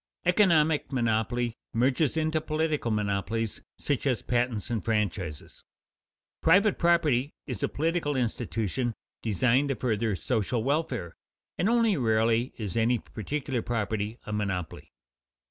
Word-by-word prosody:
Economic 165 -6 +3
monopoly 120 -1 0 0.2
merges 130 +6 +2
into 155 0 +1
political 155 -4 -1
monopolies, 105 +1 -1 0.2
such 145 -1 -1
as 125 -4 0
patents 120 -2 -1
and 115 -3 -1
franchises. 100 -8 -2 0.8
Private 195 +5 +4
property 155 -6 +2
is 125 -8 -5
a - - +1
political 160 -1 0
institution 115 -1 -1 0.3
designed 125 +6 +2
to 135 - 0
further 110 -4 0
social 110 - -1
welfare, 135 - -1 0.4
and 195 - +1
only 230 -4 +3
rarely 115 0 +2
is 105 -5 -4
any 115 +2 +3
particular 130 +4 -3
property 110 -1 -2
a 105 - -5
monopoly. 100 -5 -3
120 Hz, 120 wpm, -28 LUFS, 110-150 Hz, 0.8 s, Private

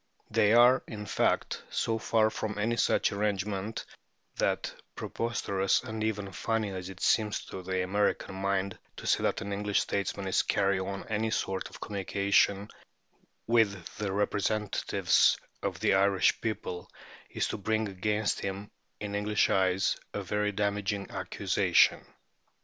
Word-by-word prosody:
They 105 - +4
are, 120 +2 +7
in 105 -3 -6
fact, - - 0
so 115 0 -1
far 110 -1 +2
from 105 -1 -4
any 110 +3 +1
such - - +2
arrangement 100 +1 -2 0.5
that - - 0 0.2
preposterous 100 -4 0
and 110 -3 -4
even 105 -3 -2
funny 110 +1 -1
as 95 -1 -5
it 95 -1 -10
seems 105 -2 +2
to 95 - -7
the 95 0 -1
American 100 +1 0
mind 95 0 -1 0.2
to - - -8
say - - +2
that - - 0
an 100 0 -4
English 105 0 +1
statesman 100 0 -2
is 95 - +3
carrying 100 -2 +1
on 100 0 -5
any 110 +1 0
sort 95 -3 -2
of - - -12
communication 100 0 +1 0.8
with 105 -6 +1
the 105 -2 -2
representatives 105 +1 +2 0.2
of - - -3
the - - +3
Irish 95 0 +3
people 100 -5 -4 0.4
is - - -1
to - - -3
bring 110 +2 0
against 105 +2 -1
him, 100 +1 -5 0.3
in 105 -1 -5
English 105 +1 +1
eyes, 95 0 +2 0.2
a - - -2
very 105 0 0
damaging 100 0 -1
accusation. - - +2
100 Hz, 145 wpm, -29 LUFS, 95-105 Hz, 0.8 s, are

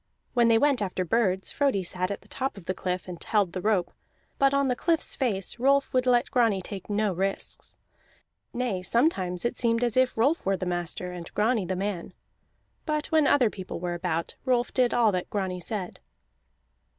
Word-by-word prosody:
When 240 -2 +4
they 230 -1 +5
went 280 -1 +3
after 185 -2 -2
birds 190 -1 +1
Frodi 275 -9 +1
sat 180 +1 -2
at 200 - -4
the - - -20
top 265 -4 -3
of 190 - -11
the 185 - -1
cliff 180 -1 -3
and 175 -2 -7
held 200 -5 +1
the 185 - -3
rope, 195 -4 +1 0.5
but 275 0 +5
on 280 0 +2
the 250 - +1
cliff's 330 +4 +1
face 220 -4 -1
Rolf 275 +2 +3
would 255 0 +2
let 245 +1 +3
Grani 230 -6 +3
take 190 +1 -8
no 205 -1 +1
risks. 195 +2 -3 0.7
Nay, 240 -7 -2
sometimes 185 - +1
it 240 - 0
seemed 230 0 +2
as 240 -2 +1
if 255 -2 +2
Rolf 280 +9 +2
were 195 0 +1
the 185 - -4
master 175 0 -3
and 175 -1 -8
Grani 220 -1 +2
the 185 - -1
man. 190 -2 -3 0.7
But 305 -1 -1
when 310 -3 +4
other 250 -7 +4
people 185 -3 -7
were 175 0 -3
about, 170 -1 -2
Rolf 250 -2 +1
did 250 -2 +3
all 230 -3 +4
that 180 -2 -3
Grani 190 -3 -2
said. 185 0 -5
210 Hz, 195 wpm, -27 LUFS, 185-250 Hz, 0.7 s, they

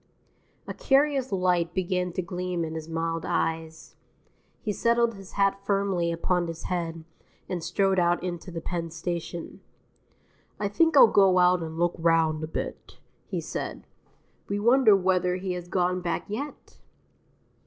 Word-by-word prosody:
A - - -5
curious 275 -1 +2
light 180 -3 +1
began 180 -1 -1
to 185 - -2
gleam 180 -1 -3
in 160 - -6
his 160 0 -6
mild 165 0 -2
eyes; 160 0 -2 0.7
he 210 - -3
settled 235 +2 +2
his 195 -2 -12
hat 195 0 +1
firmly 195 -4 0
upon 175 +1 0
his 165 0 -7
head 165 -2 -3 0.4
and 175 -3 -4
strode 190 +3 +1
out 175 0 +2
into 175 0 -5
the 165 -1 -6
Penn 170 0 -3
Station. 170 0 -5 1.0
"I 205 - -1
think 325 +8 +3
I'll - - +11
go 195 -4 +4
out 180 0 +4
and 160 0 -6
look 175 0 +1
round 165 -2 +2
a - - -3
bit," 160 - -6 0.3
he - - -3
said. - - -5 0.6
We 200 +1 -1
wonder 235 0 +5
whether 180 -1 +1
he 185 0 -3
has 175 -1 -6
gone 180 0 0
back 170 -2 -2
yet? 265 +9 -7
180 Hz, 155 wpm, -26 LUFS, 165-195 Hz, 1.0 s, I'll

